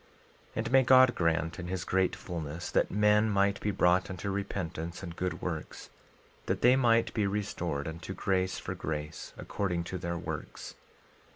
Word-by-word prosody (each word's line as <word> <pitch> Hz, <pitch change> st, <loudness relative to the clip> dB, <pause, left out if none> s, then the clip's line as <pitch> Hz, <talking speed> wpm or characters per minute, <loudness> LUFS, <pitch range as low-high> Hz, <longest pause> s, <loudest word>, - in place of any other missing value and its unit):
12:24 -, -, -30 dB, 0.5 s
And 115 Hz, +1 st, -2 dB
may 135 Hz, 0 st, +7 dB
God 130 Hz, -1 st, +6 dB
grant, 85 Hz, -1 st, 0 dB
in 90 Hz, -, -5 dB
his 90 Hz, 0 st, -3 dB
great 95 Hz, 0 st, +1 dB
fulness, 85 Hz, -1 st, -5 dB
that -, -, +2 dB
men 105 Hz, +1 st, +3 dB
might 100 Hz, 0 st, +2 dB
be 105 Hz, -, 0 dB
brought 90 Hz, -1 st, +3 dB
unto 95 Hz, +1 st, -4 dB
repentance 90 Hz, -4 st, -4 dB
and 85 Hz, -2 st, -6 dB
good 90 Hz, +1 st, -3 dB
works, 80 Hz, -3 st, -5 dB, 0.6 s
that -, -, -1 dB
they 125 Hz, +2 st, +7 dB
might 115 Hz, -3 st, +3 dB
be 105 Hz, -3 st, +1 dB
restored 90 Hz, -7 st, -2 dB
unto 85 Hz, +4 st, -6 dB
grace 95 Hz, -1 st, 0 dB
for -, -, -4 dB
grace, 75 Hz, 0 st, -5 dB
according 90 Hz, -4 st, -2 dB
to 90 Hz, +2 st, -5 dB
their 85 Hz, 0 st, -3 dB
works. 80 Hz, -4 st, -6 dB
95 Hz, 170 wpm, -30 LUFS, 85-105 Hz, 0.6 s, may